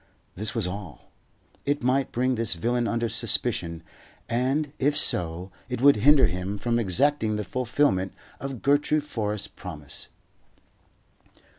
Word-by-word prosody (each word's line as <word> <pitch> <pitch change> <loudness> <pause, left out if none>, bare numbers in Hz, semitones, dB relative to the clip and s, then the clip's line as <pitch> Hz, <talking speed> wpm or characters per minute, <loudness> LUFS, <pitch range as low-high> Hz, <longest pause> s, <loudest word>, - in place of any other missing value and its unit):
This 105 +5 -4
was 115 -5 0
all. 90 -3 -7 0.5
It 145 -1 -1
might 130 +1 +1
bring 130 +2 +1
this 115 -5 +1
villain 120 +7 0
under 115 0 0
suspicion, 110 -7 -1 0.4
and, 135 +5 0
if 145 +2 +2
so, 90 - +1 0.2
it 125 - -3
would 140 0 +6
hinder 140 +5 +6
him 90 +3 -2
from 120 +2 0
exacting 110 +3 +2
the 105 - -2
fulfilment 110 - 0 0.2
of 135 -4 -6
Gertrude 145 +2 +2
Forrest's 105 -7 -2
promise. 75 -5 -7
115 Hz, 130 wpm, -26 LUFS, 95-135 Hz, 0.5 s, would